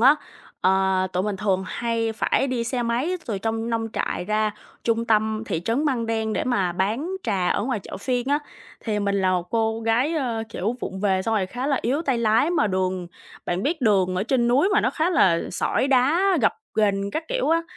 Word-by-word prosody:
á, 270 +5 +7 0.5
ờ, 190 0 +2
tụi 180 - 0
mình 205 0 -2
thường 190 -2 0
hay 230 +1 -1
phải 245 +4 +1
đi 245 -3 -1
xe 245 +1 -1
máy 245 +10 0
từ 210 -5 -2
trong 225 +2 -2
nông 225 -1 -1
trại - - -2
ra 215 +1 +1 0.3
trung 230 0 +1
tâm 220 -1 +1
thị 165 - -2
trấn 250 +7 0
Măng 245 -6 0
Đen 220 -1 -1
để - - -1
mà 195 -8 +1
bán 215 - -1
trà 195 -6 0
ở - - +1
ngoài 235 -2 -1
chợ - - -8
phiên 245 +4 -2
á. 290 - +3 0.4
Thì 215 -2 -2
mình 200 -1 0
là 185 - +2
một 180 -1 -2
cô 225 0 0
gái, 235 +8 +1
ờ, 240 -7 -1
kiểu, 225 +1 -2
vụng 190 0 -5
về 190 -2 +1
xong 225 +2 0
rồi 195 -3 +1
khá 250 +7 -4
là 280 -3 +1
yếu 275 +7 0
tay 265 -7 0
lái 225 +7 +3
mà 335 -11 +2
đường 185 -2 -1 0.4
bạn 175 +3 -1
biết 315 +2 -1
đường 195 -6 +3
ở 185 - +1
trên 240 +1 +1
núi 280 +10 +4
mà 415 - +4
nó - - +1
khá 325 +3 0
là 170 - +4
sỏi 260 +8 0
đá, 310 +9 +3
gập - - +3 0.2
ghềnh 200 -2 +1
các 315 +9 -3
kiểu - - 0
á, 330 +1 +3
225 Hz, 225 wpm, -24 LUFS, 195-255 Hz, 0.5 s, á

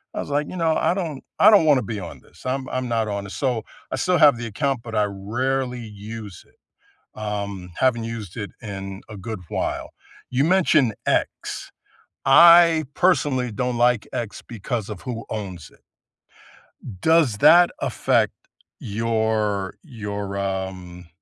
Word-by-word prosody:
I - - -3
was - - -5
like, 145 +1 0
you - - -7
know, 165 -2 +2
"I 175 - +2
don't 160 -8 -4 0.2
I - - +8
don't 200 -6 +6
wanna 140 -5 +4
be 105 0 -4
on 85 - -9
this. - - -20
I'm 130 +1 -2
I'm 130 -1 -2
not 115 -2 0
on 100 -1 -3
this." 100 - -8
So, 125 -6 -1 0.3
I - - 0
still 180 +7 +2
have 145 -6 +6
the 120 - -5
account, 135 +2 -1
but 115 -2 -7
I 105 - +3
rarely 125 +6 -2
use 105 -2 -9
it. - - -30 0.6
Um, 100 -4 -5
haven't 120 -3 +1
used 110 -5 -7
it 105 -2 -5
in 95 -3 -7
a 105 - -8
good 105 +1 -6
while. - - -3 0.4
You 130 +3 +1
mentioned 155 - +3
X. - - -1 0.6
I 170 +2 +7
personally 145 -9 +2
don't 125 +3 -2
like 120 -2 +2
X 115 -3 -4
because 115 -1 -4
of 105 -4 -7
who 120 -3 -6
owns 95 -7 -6
it. - - -23 1.2
Does 160 -10 +3
that 175 +8 +7
affect - - +1 0.5
your 110 -3 -1
your, 105 - -5
um, 95 -2 -4
115 Hz, 160 wpm, -23 LUFS, 100-135 Hz, 1.2 s, I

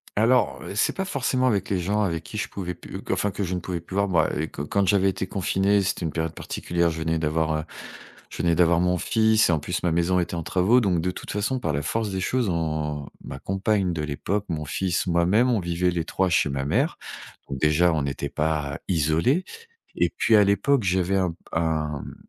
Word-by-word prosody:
Alors, 120 +4 +2
heu, - - -6
c'est - - +1
pas 190 - -2
forcément 130 -5 0
avec 100 -5 0
les 95 -2 0
gens 105 +4 0
avec 85 -4 -1
qui 105 - -8
je - - -2
pouvais 90 -3 -5
pu - - -9
enfin 105 - +1
que 100 - -3
je 90 0 -2
ne 90 - -1
pouvais 85 -1 -4
plus 95 +3 -9
voir, 100 0 +2
ben, 85 -4 +3
heu, 75 - -1
que 70 - -7
quand 100 +5 0
j'avais 95 0 +4
été 95 0 -3
confiné, 100 +1 +1
c'était 95 -2 -2
une 80 - -2
période 80 -1 -2
particulière, 85 0 -1
je 80 0 -5
venais 80 0 0
d'avoir, 80 0 0
heu, 80 - -3 0.7
je - - -8
venais 85 -1 +3
d'avoir 85 -1 +4
mon 90 0 +2
fils 110 +1 +3
et - - +4
en 80 - +1
plus 85 +4 -3
ma 85 - +2
maison 85 +2 +2
était 85 0 -2
en 85 - -3
travaux, 95 +9 +3
donc 90 -5 +1
de 90 +1 -1
toute - - -9
façon 110 +6 -1
par 80 -11 -2
la 70 - -1
force 110 +5 -1
des 95 0 -2
choses, 120 +1 0
on 75 -3 -2 0.2
ma - - -7
compagne 95 -1 0
de 80 - -3
l'époque, 95 +8 -2
mon 75 -2 -3
fils, 90 +5 -1
moi-même, 90 +9 +3
on 110 - +2
vivait 90 +1 0
les 85 -2 -2
3 95 -1 0
chez 80 -3 +2
ma 70 0 -2
mère, - - +1 0.5
donc 70 -1 -4
déjà 80 +3 +3
on 75 -3 0
était 70 +1 -3
pas 75 -2 -1
isolés 85 - +2 0.5
et - - +2
puis 115 - +4
à 105 - +7
l'époque 120 +5 +2
j'avais 95 +1 +1
un 90 -3 0 0.2
un, 80 -3 -1
mmh, - - -9
90 Hz, 230 wpm, -24 LUFS, 80-100 Hz, 0.7 s, à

